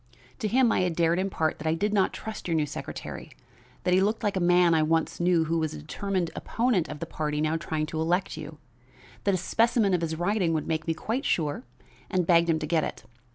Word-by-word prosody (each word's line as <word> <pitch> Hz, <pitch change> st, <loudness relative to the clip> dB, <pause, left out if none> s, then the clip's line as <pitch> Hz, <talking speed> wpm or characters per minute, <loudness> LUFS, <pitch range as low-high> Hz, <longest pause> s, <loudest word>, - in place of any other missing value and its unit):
To 215 Hz, -, -1 dB
him 240 Hz, +1 st, +3 dB
I -, -, +2 dB
had 180 Hz, -2 st, 0 dB
dared 170 Hz, +1 st, +2 dB
impart 180 Hz, -5 st, -1 dB
that 155 Hz, -, -4 dB
I 160 Hz, -, +2 dB
did 205 Hz, +5 st, -1 dB
not 195 Hz, -3 st, +3 dB
trust 220 Hz, -3 st, -7 dB
your 165 Hz, -, 0 dB
new 155 Hz, -2 st, +2 dB
secretary; 145 Hz, -, -7 dB, 0.5 s
that 180 Hz, -, +2 dB
he 185 Hz, -, +5 dB
looked 215 Hz, +4 st, 0 dB
like 205 Hz, -2 st, 0 dB
a -, -, +1 dB
man 175 Hz, -1 st, +4 dB
I 160 Hz, -, +4 dB
once 160 Hz, +1 st, 0 dB
knew 175 Hz, -1 st, +3 dB
who 165 Hz, +1 st, 0 dB
was 155 Hz, -1 st, -2 dB
a -, -, -6 dB
determined 175 Hz, +3 st, -2 dB
opponent 225 Hz, -8 st, 0 dB
of -, -, -5 dB
the -, -, -2 dB
party 150 Hz, -2 st, -3 dB
now 155 Hz, +1 st, +1 dB
trying 160 Hz, -1 st, -2 dB
to 160 Hz, +1 st, -4 dB
elect 175 Hz, +4 st, 0 dB
you; 155 Hz, 0 st, -8 dB, 0.7 s
that 200 Hz, -2 st, +3 dB
a -, -, 0 dB
specimen 220 Hz, +2 st, +2 dB
of 180 Hz, -, +2 dB
his 160 Hz, -1 st, -2 dB
writing 175 Hz, 0 st, +1 dB
would 155 Hz, -, -1 dB
make 160 Hz, 0 st, -2 dB
me 165 Hz, -, 0 dB
quite 235 Hz, -, -2 dB
sure, 160 Hz, -, -1 dB, 0.4 s
and 185 Hz, -3 st, +1 dB
begged 170 Hz, 0 st, +4 dB
him 160 Hz, -, +3 dB
to 155 Hz, -, -3 dB
get 160 Hz, 0 st, +1 dB
it. -, -, -5 dB
170 Hz, 240 wpm, -27 LUFS, 160-195 Hz, 0.7 s, he